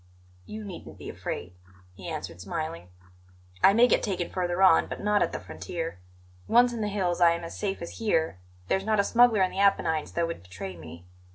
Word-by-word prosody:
"You 215 0 -7
needn't 195 -4 -9
be - - -8
afraid," 90 0 -6 0.4
he 95 -1 -8
answered, 85 - -6
smiling; 155 - -5 0.8
"I 195 - +8
may 235 +3 +6
get - - +3
taken 180 -5 -2
further 180 0 0
on, 185 -4 +6
but - - -6
not 210 0 +2
at - - +1
the - - -4
frontier. 90 - -6 0.5
Once 240 +1 +5
in 230 - -4
the 210 - 0
hills 185 -4 -1
I 170 -1 +6
am 170 0 -5
as 165 - -7
safe 195 -3 -3
as 170 - -8
here; 160 - 0 0.3
there's 190 - +1
not 215 0 +1
a - - +5
smuggler 230 -3 +4
in 185 - 0
the 190 - -5
Apennines 180 -6 +2
that 170 - +1
would 165 0 -5
betray 90 +1 -8
me. 85 +1 -11
175 Hz, 205 wpm, -27 LUFS, 155-205 Hz, 0.8 s, I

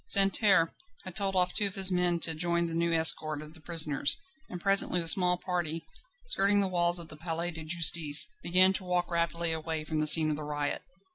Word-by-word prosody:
Santerne 195 -3 +2 0.3
had 185 -2 -12
told 195 -2 -1
off 180 -1 0
two 210 - +2
of 195 - -9
his 190 -1 +1
men 180 -1 -1
to 165 - -1
join 170 +1 -2
the 165 - -7
new 170 +1 -2
escort 160 -2 +2
of 155 +1 -13
the 160 - -17
prisoners, 155 -3 0 0.3
and 180 - -9
presently 195 -1 +2
the 165 - -4
small 180 +1 +4
party, 170 -3 -6 0.4
skirting 205 - +3
the 195 - -1
walls 175 -1 -1
of 170 -2 -7
the - - -12
Palais 165 +2 -5
de 165 -1 -9
Justice, 160 -2 +4 0.2
began 185 +2 +2
to 190 - -6
walk 180 -1 -4
rapidly 170 0 -2
away 160 -1 -5
from 155 0 -5
the 155 - -1
scene 155 0 +6
of 150 - -5
the 155 - -8
riot. 145 -1 -5
170 Hz, 215 wpm, -27 LUFS, 160-180 Hz, 0.4 s, scene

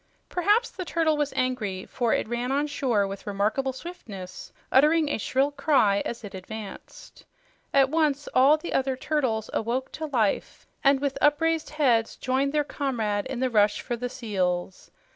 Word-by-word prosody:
Perhaps 415 +7 +2
the 370 - -5
turtle 325 -2 +1
was 295 -1 -1
angry, 245 -8 -1
for 240 -3 -1
it - - +1
ran 240 +2 -2
on 285 +2 +1
shore 255 -8 0
with 195 +1 -7
remarkable 210 +7 0
swiftness, 220 - -9 0.2
uttering 305 +3 +5
a 290 - -1
shrill 270 +6 +1
cry 270 -9 +3
as 235 0 -5
it 205 - -8
advanced. 200 +2 -9 0.5
At 275 -1 +4
once 300 -3 +1
all 275 +4 +6
the 340 - -6
other 265 0 +1
turtles 255 -6 -1
awoke 240 +4 -1
to 315 0 -5
life 230 -8 -1 0.2
and 275 -1 +5
with 280 -1 -2
upraised 320 +2 +2
heads 250 -7 +2
joined 270 +1 0
their 300 0 +2
comrade 230 -9 -2
in 260 -2 -4
the 260 - +2
rush 210 -2 +3
for 240 - -3
the 245 +1 -4
seals. 185 -6 -2
260 Hz, 165 wpm, -26 LUFS, 220-295 Hz, 0.5 s, all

